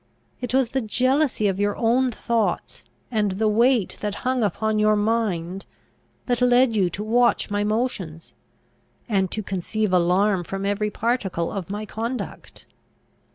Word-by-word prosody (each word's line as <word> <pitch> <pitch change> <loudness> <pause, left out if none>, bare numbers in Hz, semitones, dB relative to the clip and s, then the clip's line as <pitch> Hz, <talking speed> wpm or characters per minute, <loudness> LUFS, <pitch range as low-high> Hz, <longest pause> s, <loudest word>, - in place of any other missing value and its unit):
It 245 - -3
was 265 -3 +3
the 265 +1 -1
jealousy 255 +1 +1
of 195 -1 -1
your 205 0 0
own 250 +3 +2
thoughts, 205 - -2 0.3
and 210 -4 +1
the 215 +3 0
weight 230 0 +2
that 210 -1 -2
hung 255 -1 +1
upon 215 +1 0
your 215 0 +4
mind, 205 -4 -1 0.6
that 245 -2 0
led 245 -1 +4
you 190 -4 +2
to 195 +4 -5
watch 235 0 +2
my 205 0 0
motions, 210 -7 -3 0.7
and 195 -5 +1
to 215 - -3
conceive 195 +2 -2
alarm 180 +2 +3
from 195 +3 -5
every 205 +1 0
particle 210 -7 -1
of 195 -2 -5
my 210 +2 -4
conduct. 230 +5 -6
215 Hz, 150 wpm, -23 LUFS, 195-235 Hz, 0.7 s, your